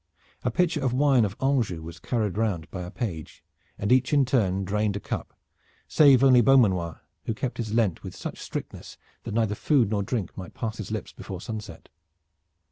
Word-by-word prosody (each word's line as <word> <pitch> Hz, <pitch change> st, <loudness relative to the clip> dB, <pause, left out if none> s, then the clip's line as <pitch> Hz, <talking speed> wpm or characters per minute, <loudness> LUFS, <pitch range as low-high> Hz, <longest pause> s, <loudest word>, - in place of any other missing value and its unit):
A 125 Hz, -, 0 dB
pitcher 165 Hz, +3 st, +1 dB
of 130 Hz, -2 st, +1 dB
wine 135 Hz, -3 st, +4 dB
of 100 Hz, 0 st, -4 dB
Anjou 120 Hz, -, 0 dB
was 85 Hz, +1 st, -9 dB
carried 110 Hz, -6 st, -1 dB
round 100 Hz, -7 st, -1 dB
by 90 Hz, -, -5 dB
a 90 Hz, -, -6 dB
page, 90 Hz, -, -6 dB, 0.3 s
and 100 Hz, -, -2 dB
each 130 Hz, 0 st, +4 dB
in 140 Hz, -2 st, +5 dB
turn 100 Hz, -7 st, +1 dB
drained 105 Hz, +1 st, 0 dB
a -, -, -2 dB
cup, -, -, -5 dB, 0.6 s
save 140 Hz, -4 st, +6 dB
only 130 Hz, -2 st, +7 dB
Beaumanoir 95 Hz, -10 st, +3 dB, 0.2 s
who 115 Hz, -, -2 dB
kept 125 Hz, +3 st, -3 dB
his 110 Hz, -3 st, -3 dB
Lent 110 Hz, -8 st, +1 dB
with -, -, -8 dB
such -, -, -6 dB
strictness -, -, -7 dB, 0.3 s
that 110 Hz, -2 st, -4 dB
neither 110 Hz, -3 st, +1 dB
food 120 Hz, -1 st, +2 dB
nor 105 Hz, -2 st, +1 dB
drink 100 Hz, 0 st, -3 dB
might 95 Hz, -2 st, -9 dB
pass 110 Hz, -2 st, -4 dB
his 105 Hz, -, -5 dB
lips 110 Hz, 0 st, -5 dB
before 95 Hz, -3 st, -7 dB
sunset. 105 Hz, -4 st, -7 dB
110 Hz, 190 wpm, -26 LUFS, 95-125 Hz, 0.6 s, only